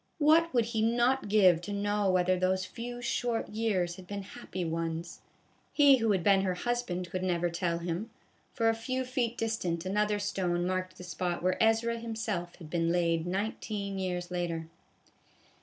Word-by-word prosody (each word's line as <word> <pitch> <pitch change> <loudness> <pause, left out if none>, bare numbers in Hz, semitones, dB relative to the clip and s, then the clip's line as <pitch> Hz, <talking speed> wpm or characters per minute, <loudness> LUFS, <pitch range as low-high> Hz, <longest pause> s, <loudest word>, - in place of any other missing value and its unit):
What 325 +2 +4
would 240 -3 +2
he 225 -1 -1
not 240 +1 +2
give 185 -5 +5
to 175 - -6
know 205 0 0
whether 185 0 +3
those 185 +1 +1
few 245 +2 -7
short 240 -2 -1
years 200 -6 -1
had 185 -1 -12
been 200 0 -5
happy 185 -1 -6
ones. 165 +1 -3 0.5
He 285 -3 +7
who 225 -3 +1
had 190 -4 +1
been 195 0 +5
her 185 -2 0
husband 185 -6 -2
could 185 - -2
never 175 -2 0
tell 170 0 -1
him; 175 +6 -3 0.4
for 230 -2 0
a 225 - +4
few 255 +3 -3
feet 245 -2 -1
distant 185 -7 -2
another 210 +2 +1
stone 180 -4 -1
marked 185 0 -2
the - - -9
spot 175 0 -3
where 185 0 +1
Ezra 225 +1 +2
himself 220 -6 -3
had 165 - -11
been 165 +1 0
laid 170 -1 +1
nineteen 200 +1 -3
years 180 -1 -3
later. 170 -2 -2
190 Hz, 175 wpm, -30 LUFS, 175-225 Hz, 0.5 s, He